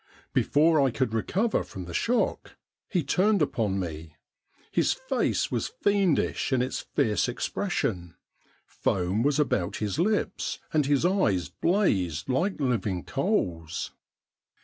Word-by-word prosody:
Before 155 Hz, +1 st, +4 dB
I 135 Hz, -, +4 dB
could 125 Hz, -2 st, -1 dB
recover 195 Hz, -, 0 dB
from 95 Hz, -2 st, -8 dB
the 85 Hz, -, -8 dB
shock 245 Hz, -, 0 dB, 0.3 s
he 180 Hz, -6 st, 0 dB
turned 195 Hz, +9 st, +2 dB
upon 110 Hz, -, 0 dB
me. 80 Hz, -3 st, -6 dB, 0.6 s
His -, -, +2 dB
face -, -, -1 dB
was -, -, -1 dB
fiendish 200 Hz, -, +1 dB
in 125 Hz, -1 st, +3 dB
its 130 Hz, -, -3 dB
fierce 110 Hz, +2 st, 0 dB
expression; 105 Hz, -, -2 dB, 0.5 s
foam 95 Hz, +3 st, -1 dB
was 145 Hz, +3 st, +2 dB
about 100 Hz, -10 st, 0 dB
his 105 Hz, -3 st, -2 dB
lips, 210 Hz, +4 st, 0 dB, 0.2 s
and 150 Hz, -3 st, +2 dB
his 145 Hz, +2 st, +2 dB
eyes 145 Hz, -, +2 dB
blazed 95 Hz, -, 0 dB
like 170 Hz, +10 st, 0 dB
living 105 Hz, -, 0 dB
coals. 90 Hz, -, -1 dB
130 Hz, 125 wpm, -27 LUFS, -, 0.6 s, Before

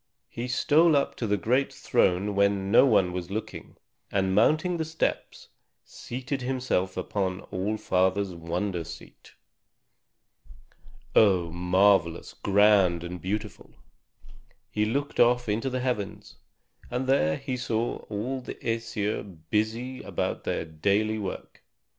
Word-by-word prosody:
He 120 Hz, +2 st, -5 dB
stole 155 Hz, +6 st, +4 dB
up 140 Hz, -, +1 dB
to 115 Hz, -, -2 dB
the 105 Hz, 0 st, +1 dB
great 125 Hz, +8 st, +1 dB
throne 95 Hz, +3 st, +1 dB
when 100 Hz, -1 st, +1 dB
no 120 Hz, -, +7 dB
one 95 Hz, -7 st, +3 dB
was 90 Hz, -1 st, -4 dB
looking, 110 Hz, +3 st, -6 dB, 0.3 s
and 95 Hz, -1 st, +1 dB
mounting 155 Hz, -, +3 dB
the 160 Hz, -, -1 dB
steps, 160 Hz, +1 st, -3 dB, 0.4 s
seated 130 Hz, +2 st, -5 dB
himself 125 Hz, -8 st, -1 dB
upon 95 Hz, 0 st, -2 dB
All 100 Hz, +4 st, -1 dB
Father's 95 Hz, 0 st, +1 dB
wonder 85 Hz, +2 st, -3 dB
seat. -, -, -12 dB, 1.8 s
Oh, 90 Hz, -6 st, +4 dB
marvelous, 90 Hz, 0 st, +2 dB
grand, 100 Hz, -4 st, +3 dB
and 90 Hz, 0 st, -6 dB
beautiful! 105 Hz, +4 st, -5 dB, 1.0 s
He 105 Hz, 0 st, +1 dB
looked 140 Hz, +6 st, -2 dB
off 120 Hz, 0 st, +4 dB
into 110 Hz, +5 st, -1 dB
the 130 Hz, 0 st, -2 dB
heavens, 120 Hz, -6 st, -4 dB, 0.5 s
and 125 Hz, +2 st, -2 dB
there 80 Hz, -, +2 dB
he 130 Hz, -, -4 dB
saw 120 Hz, -2 st, -1 dB
all 120 Hz, +6 st, -3 dB
the -, -, -7 dB
Æsir 110 Hz, -4 st, -3 dB
busy 115 Hz, +4 st, -1 dB
about -, -, -3 dB
their -, -, -2 dB
daily 100 Hz, +7 st, 0 dB
work. 95 Hz, -3 st, -6 dB
105 Hz, 125 wpm, -27 LUFS, 95-125 Hz, 1.8 s, no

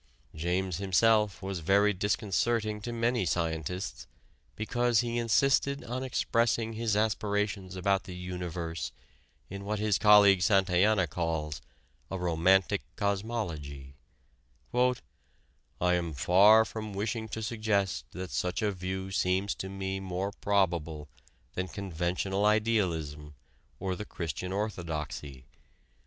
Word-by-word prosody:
James 90 Hz, +2 st, -1 dB
himself 105 Hz, +1 st, +2 dB
was 95 Hz, -2 st, -3 dB
very 100 Hz, +5 st, +3 dB
disconcerting 105 Hz, +2 st, 0 dB
to 120 Hz, -, -5 dB
many 115 Hz, -1 st, +1 dB
scientists 80 Hz, -4 st, -2 dB, 0.5 s
because 120 Hz, +2 st, +1 dB
he 120 Hz, 0 st, -2 dB
insisted 135 Hz, +4 st, +2 dB
on 125 Hz, +2 st, -4 dB
expressing 115 Hz, -3 st, 0 dB
his 110 Hz, -1 st, 0 dB
aspirations 105 Hz, -3 st, -1 dB
about 95 Hz, +1 st, +1 dB
the 90 Hz, -2 st, -8 dB
universe 90 Hz, -2 st, -4 dB, 0.6 s
in 100 Hz, +1 st, -7 dB
what 105 Hz, +1 st, -2 dB
his 105 Hz, -1 st, +1 dB
colleague 105 Hz, -3 st, +7 dB
Santayana 95 Hz, 0 st, +3 dB
calls 80 Hz, -1 st, -3 dB, 0.5 s
a 95 Hz, -, -3 dB
"romantic 90 Hz, +1 st, +2 dB
cosmology": 95 Hz, -, -3 dB, 0.8 s
"I 125 Hz, +1 st, +3 dB, 0.9 s
am 90 Hz, -2 st, +1 dB
far 100 Hz, -, +6 dB
from 110 Hz, -1 st, -6 dB
wishing 110 Hz, +3 st, -2 dB
to 110 Hz, +1 st, -4 dB
suggest 105 Hz, -, 0 dB
that 90 Hz, +4 st, -7 dB
such 90 Hz, +4 st, -1 dB
a 105 Hz, -, +2 dB
view 95 Hz, 0 st, -4 dB
seems 95 Hz, +1 st, +1 dB
to 95 Hz, -, -6 dB
me 95 Hz, 0 st, -3 dB
more 95 Hz, +1 st, -3 dB
probable 85 Hz, -8 st, 0 dB, 0.4 s
than 90 Hz, 0 st, -2 dB
conventional 95 Hz, +1 st, -2 dB
idealism 85 Hz, -9 st, 0 dB, 0.4 s
or 95 Hz, -1 st, -2 dB
the 105 Hz, -, -6 dB
Christian 85 Hz, +1 st, -5 dB
Orthodoxy. 80 Hz, -9 st, -4 dB
95 Hz, 115 wpm, -30 LUFS, 90-105 Hz, 0.9 s, colleague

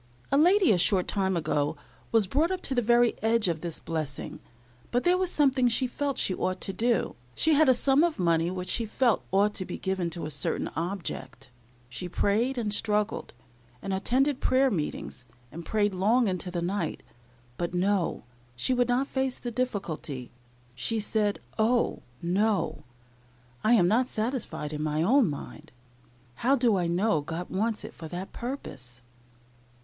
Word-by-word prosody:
A -, -, +3 dB
lady, 360 Hz, -, +5 dB
a 185 Hz, -, +3 dB
short 185 Hz, +1 st, +3 dB
time 190 Hz, -3 st, 0 dB
ago, 150 Hz, -2 st, 0 dB, 0.3 s
was 225 Hz, -3 st, +4 dB
brought 295 Hz, -, +1 dB
up 375 Hz, -1 st, -2 dB
to 270 Hz, -, -1 dB
the 245 Hz, -, +2 dB
very 240 Hz, +1 st, +4 dB
edge 225 Hz, -1 st, +2 dB
of 165 Hz, -3 st, -1 dB
this 170 Hz, -2 st, -1 dB
blessing, 155 Hz, -4 st, -4 dB, 0.5 s
but 245 Hz, +1 st, 0 dB
there 355 Hz, +1 st, +4 dB
was 370 Hz, -1 st, 0 dB
something 265 Hz, -4 st, +3 dB
she 245 Hz, +3 st, +2 dB
felt 275 Hz, +2 st, -2 dB
she 185 Hz, -, +1 dB
ought 185 Hz, 0 st, -2 dB
to 195 Hz, -, -3 dB
do. 230 Hz, +5 st, 0 dB, 0.2 s
She 320 Hz, -, +3 dB
had 305 Hz, -1 st, +5 dB
a 260 Hz, -, +6 dB
sum 275 Hz, +4 st, +3 dB
of 340 Hz, -2 st, +1 dB
money 170 Hz, -2 st, +2 dB
which 180 Hz, 0 st, -4 dB
she 230 Hz, -2 st, 0 dB
felt 240 Hz, +1 st, +1 dB
ought 200 Hz, +2 st, +3 dB
to 190 Hz, -, -3 dB
be -, -, -6 dB
given 190 Hz, -2 st, -1 dB
up 170 Hz, -, -5 dB
to 170 Hz, -, -5 dB
a 155 Hz, -, -4 dB
certain 145 Hz, -2 st, 0 dB
object. 165 Hz, -8 st, -5 dB, 0.4 s
She 125 Hz, +8 st, -6 dB
prayed 230 Hz, +9 st, +1 dB
and 215 Hz, -3 st, -1 dB
struggled, 210 Hz, -, -1 dB, 0.4 s
and 195 Hz, +8 st, -4 dB
attended 260 Hz, +8 st, +1 dB
prayer 260 Hz, 0 st, +3 dB
meetings, 150 Hz, -, -4 dB, 0.3 s
and 170 Hz, -, -7 dB
prayed 210 Hz, -2 st, +1 dB
long 220 Hz, +6 st, +3 dB
into 185 Hz, -1 st, -2 dB
the 175 Hz, -1 st, -3 dB
night; 175 Hz, -2 st, -2 dB, 0.5 s
but, 175 Hz, 0 st, -3 dB
no, 190 Hz, 0 st, 0 dB, 0.3 s
she 190 Hz, -, 0 dB
would 245 Hz, -1 st, +2 dB
not 250 Hz, +3 st, +2 dB
face 265 Hz, -2 st, -1 dB
the 240 Hz, -, -5 dB
difficulty. 185 Hz, -, -3 dB, 0.4 s
She 220 Hz, -, -1 dB
said, 210 Hz, -1 st, 0 dB, 0.2 s
"Oh! 235 Hz, +2 st, +2 dB, 0.2 s
no; 200 Hz, +4 st, 0 dB, 0.8 s
I 225 Hz, -, +4 dB
am 185 Hz, -7 st, +5 dB
not 245 Hz, +6 st, +2 dB
satisfied 220 Hz, -, -3 dB
in 150 Hz, -, -3 dB
my 155 Hz, +1 st, 0 dB
own 245 Hz, -, +4 dB
mind. 150 Hz, +2 st, -8 dB, 0.7 s
How 265 Hz, -, +3 dB
do 240 Hz, -5 st, +3 dB
I 180 Hz, -2 st, 0 dB
know 175 Hz, 0 st, +1 dB
God 165 Hz, +4 st, -5 dB
wants 215 Hz, +3 st, -1 dB
it -, -, -8 dB
for 160 Hz, -, -9 dB
that 180 Hz, +4 st, -6 dB
purpose?" 130 Hz, -, -7 dB
205 Hz, 175 wpm, -28 LUFS, 170-245 Hz, 0.8 s, a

